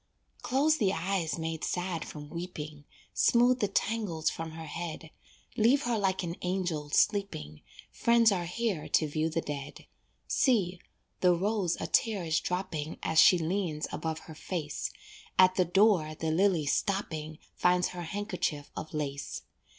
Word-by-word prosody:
Close 295 +5 +2
the 195 -6 +2
eyes 175 -2 -1
made 160 -1 -4
sad 175 -2 -2
from 150 -1 -8
weeping, 155 -4 -6 0.3
Smooth 245 +1 +4
the 205 - +2
tangles 195 -6 0
from 160 -1 -6
her 160 0 -7
head, 160 0 -6 0.4
Leave 245 +6 +4
her 240 -1 0
like 190 -3 0
an 170 0 -4
angel 180 -5 -2
sleeping, 145 - 0 0.3
Friends 235 -1 +4
are 175 -3 -1
here 195 -3 -2
to 155 - +3
view 155 +2 -1
the 165 +1 -1
dead. 145 -1 -6 0.4
See, 190 -9 +2 0.4
the 180 -1 +4
rose 195 -1 0
a - - -3
tear 215 -5 +1
is 160 -1 +2
dropping 165 -4 -3
As 160 - +2
she 180 - +7
leans 165 -2 -1
above 160 -1 -3
her 160 - -11
face, 155 -1 -4 0.5
At 185 0 +7
the 185 -1 +2
door 180 -4 +3
the 160 0 -2
lily 175 -2 +2
stopping, 160 -3 -1 0.2
Finds 180 0 +2
her 180 - -6
handkerchief 175 -5 -3
of 155 - -6
lace. 140 -2 -4
175 Hz, 150 wpm, -30 LUFS, 155-200 Hz, 0.5 s, she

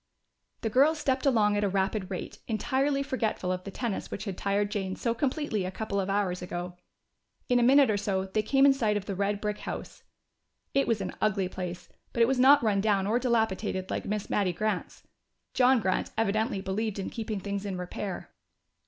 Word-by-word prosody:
The 225 - -1
girls 285 +7 +4
stepped 270 -2 0
along 210 -5 +3
at 205 - +1
a 200 - +2
rapid 195 0 -1
rate, 185 - -6
entirely 270 +5 0
forgetful 225 -8 -1
of 185 0 -3
the - - -5
tennis 225 0 -3
which 210 - -5
had 195 -3 -4
tired 200 +2 0
Jane 190 -2 -2
so 235 - -1
completely 255 -4 -1
a 185 - -2
couple 200 +1 -3
of 195 0 -2
hours 195 -3 0
ago. 180 0 -5 0.7
In 245 -1 +4
a - - +3
minute 265 0 +6
or 205 - +1
so 195 -2 -1
they 195 +3 0
came 270 +6 +3
in 280 - +7
sight 220 -6 +1
of 200 - -5
the 200 - -3
red 200 +1 -1
brick 210 0 -3
house. - - -7 0.7
It 275 - +2
was 225 -3 +1
an 185 - -4
ugly 200 -3 +1
place, 180 -2 -6 0.3
but 235 - +4
it - - +4
was 265 0 +1
not 270 +1 +7
run 205 -3 +2
down 200 -2 +2
or 225 +4 +2
dilapidated 220 -6 0
like - - -2
Miss 210 0 -2
Mattie 190 -3 +1
Grant's. 210 +1 -3 0.5
John 255 0 +5
Grant 190 -3 0
evidently 220 0 0
believed 200 +2 -2
in 195 - -4
keeping 220 -2 -4
things 200 0 -4
in 195 -3 -4
repair. 180 +1 -5
210 Hz, 205 wpm, -28 LUFS, 195-235 Hz, 0.7 s, in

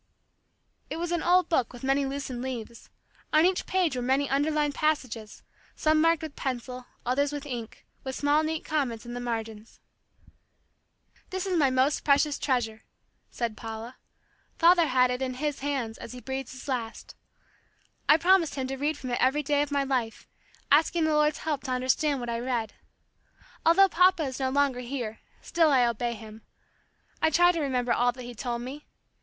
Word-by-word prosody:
It - - -4
was 345 +1 -3
an 345 -2 0
old 360 0 +4
book 260 -8 +1
with 245 0 -12
many 270 +1 +1
loosened 270 -3 -4
leaves. 235 -3 -6 0.4
On 310 +2 +5
each 370 0 +1
page 360 -7 +1
were 250 - -2
many 265 +3 +1
underlined 295 +1 +1
passages, 255 -9 -2 0.3
some 310 0 +2
marked 330 0 +3
with 310 -3 -6
pencil, 250 -1 -4 0.2
others 280 +3 +1
with 290 0 -5
ink, 240 -5 -7 0.2
with 265 -1 -4
small 290 +1 +2
neat 315 0 -3
comments 255 -7 -2
in 240 - -7
the 245 - -4
margins. 225 -2 -5 1.5
"This 375 0 -3
is 375 -2 -1
my 290 -5 +4
most 260 +3 +1
precious 285 0 +3
treasure," 230 -5 -1 0.5
said 235 -3 -3
Paula. 225 +2 -7 0.6
"Father 340 -1 +5
had 255 -2 +3
it 250 +1 -3
in 255 -1 -2
his 295 +2 -2
hands 265 -6 -3
as 230 - -8
he 250 - -8
breathed 265 0 -5
his 260 +1 -10
last. 235 -4 -4 1.0
I 300 - +8
promised 350 -1 +3
him 265 -2 -2
to 270 - -3
read 295 +2 -1
from 255 -3 -6
it 240 - -1
every 275 +4 +2
day 290 0 +2
of 290 - -1
my 285 -1 +1
life, 250 -5 -2 0.4
asking 320 +3 +4
the 315 0 +2
Lord's 300 0 +3
help 300 -4 -2
to 260 - -3
understand 260 +3 +1
what 240 - -5
I 230 0 -2
read. 235 -3 -2 0.9
Although 365 +4 +6
Papa 365 -1 +4
is 265 -2 -4
no 260 -1 0
longer 275 -2 +1
here, 240 -3 -5 0.2
still 330 -2 +3
I 255 -3 +5
obey 235 0 -1
him. 220 0 -11 0.8
I 320 - +4
try 350 +3 +5
to 335 -2 -2
remember 250 -4 0
all 245 0 +2
that 250 0 -9
he 245 0 -8
told 240 0 -4
me. 280 +4 -8
270 Hz, 185 wpm, -27 LUFS, 245-305 Hz, 1.5 s, I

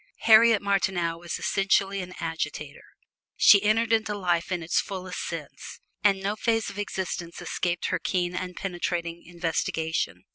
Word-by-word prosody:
Harriet 225 -1 +6
Martineau 190 -4 0
was 170 0 -4
essentially 195 0 +1
an 180 0 -8
agitator. 155 -3 -5 0.5
She 200 - +7
entered 225 +2 +2
into 220 -2 +1
life 175 -2 0
in 175 -2 -2
its 160 - +1
fullest 185 -2 -6
sense, 165 -4 -7 0.2
and 195 -2 +3
no 200 +2 -1
phase 225 0 0
of 205 - -9
existence 185 -4 -4
escaped 175 -1 -2
her 185 - 0
keen 180 +1 -1
and 180 0 -4
penetrating 175 -2 -3
investigation. 165 -1 -2
185 Hz, 145 wpm, -26 LUFS, 170-200 Hz, 0.5 s, She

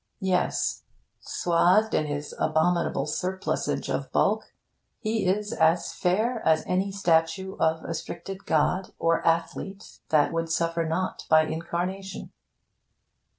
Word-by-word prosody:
Yes! 185 -3 0 0.4
Swathed 180 +5 +2
in 155 - +1
his 145 0 -4
abominable 160 -2 +1
surplusage 185 +5 -2
of - - -3
bulk, - - +1 0.5
he 220 -3 -1
is 205 +3 0
as 160 +2 +2
fair 220 +6 0
as 160 -1 +3
any 190 +2 0
statue 185 0 +1
of 160 0 +1
astricted 185 +4 -6
god 180 +5 +1
or 165 0 +1
athlete 170 +4 -2
that 150 -1 +3
would 165 0 -1
suffer 165 0 0
not 165 +4 -2
by 155 0 +6
incarnation... 175 +4 -4
170 Hz, 115 wpm, -26 LUFS, 160-190 Hz, 0.5 s, by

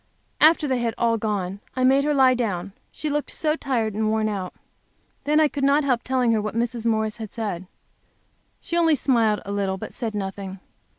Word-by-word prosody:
After 310 0 +5
they 260 -2 0
had 235 -1 -1
all 230 -1 +1
gone, 200 -3 -2 0.2
I 255 - 0
made 270 +2 +4
her 300 - +2
lie 260 -2 +5
down, 200 -6 -2 0.2
she 310 - -5
looked 295 0 -1
so 310 -1 0
tired 235 -8 -1
and 215 +1 0
worn 220 0 +1
out. 190 -3 -4 0.7
Then, 300 +1 +3
I 310 - +5
could 285 -1 -4
not 280 +2 +4
help 250 -4 +1
telling 255 -2 +1
her 220 -2 +2
what 215 +1 -4
Mrs. 235 0 -1
Morris 220 0 0
had 220 -3 -7
said. 200 -6 -4 0.9
She 340 - -4
only 330 -2 +4
smiled 230 -5 +2
a 200 - -5
little, 195 -1 -1
but - - -8
said 225 -4 -4
nothing. 195 -1 -5
230 Hz, 200 wpm, -24 LUFS, 210-275 Hz, 0.9 s, After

